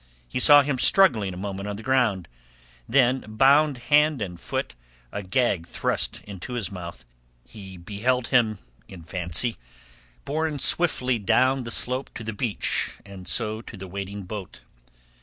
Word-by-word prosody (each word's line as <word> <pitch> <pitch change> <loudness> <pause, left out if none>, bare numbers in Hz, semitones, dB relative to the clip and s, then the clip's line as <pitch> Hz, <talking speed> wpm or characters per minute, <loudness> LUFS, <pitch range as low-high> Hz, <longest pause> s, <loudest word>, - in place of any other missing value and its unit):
He 125 - -4
saw 145 +2 +8
him 140 -2 -2
struggling 120 - +4
a 90 - -9
moment 100 +1 -5
on 105 - -4
the 110 - -9
ground, 120 -8 0 0.6
then, 130 0 +2
bound 135 +6 +3 0.2
hand 150 -1 +4
and 90 -5 -6
foot, - - -4 0.4
a 100 - -5
gag 95 -3 -1
thrust - - -2
into 100 +4 -9
his 120 -5 -3
mouth, 85 -9 -9 0.4
he 95 -4 -11
beheld 110 +8 -2
him 115 -5 +2 0.3
in 90 -4 -12
fancy 90 +6 0 0.7
borne 155 +1 -2
swiftly 130 -6 +3
down 130 +5 +1
the - - -6
slope 125 +3 +1
to 115 - -7
the 110 0 -5
beach 105 -2 -3
and 95 -2 -11
so 110 +1 +1
to 115 - -11
the 95 0 -9
waiting 100 +2 -7
boat. 95 0 -9
110 Hz, 155 wpm, -24 LUFS, 95-130 Hz, 0.7 s, saw